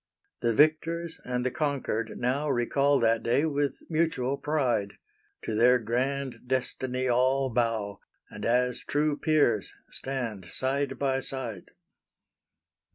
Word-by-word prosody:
The 115 -1 +1
victors 160 +3 +2
and 125 0 -2
the 130 - +1
conquered 130 -7 -2
now 135 +5 0
Recall 140 +2 +2
that 115 0 +3
day 130 +6 +2
with 145 -2 0
mutual 155 -5 0
pride; 125 -10 0 0.5
To 110 - -3
their 120 +3 +5
grand 125 +3 -2
destiny 130 0 -1
all 130 +2 +2
bow, 110 -4 0 0.3
And - - -9
as 125 +1 +2
true 150 0 +1
peers, 145 - +2 0.2
stand 120 -8 -4
side 135 +8 -1
by 135 -1 +1
side. 120 -8 -5
130 Hz, 120 wpm, -28 LUFS, 120-140 Hz, 0.5 s, their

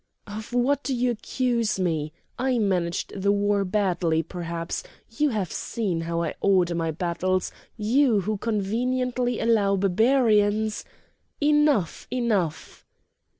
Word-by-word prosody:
"Of 215 +2 -8
what 250 +4 +2
do 265 0 -2
you 245 0 +1
accuse 235 -2 -1
me? 160 -4 -1 0.3
I 255 0 +1
managed 180 -5 -1
the 200 +1 +3
war 205 0 +2
badly, 180 -4 +1
perhaps! 170 0 -4 0.3
You 295 +6 +1
have 205 - -2
seen 190 -8 -2
how 170 0 -2
I 160 - -2
order 185 -3 +3
my 165 -1 -1
battles, 175 +3 -1 0.3
you 230 0 +3
who 215 +3 -2
conveniently 245 +4 -1
allow 210 -4 +3
Barbarians—" 215 +1 +2 0.5
"Enough! 295 - +2
enough!" 215 -10 -1
205 Hz, 120 wpm, -25 LUFS, 180-240 Hz, 0.5 s, the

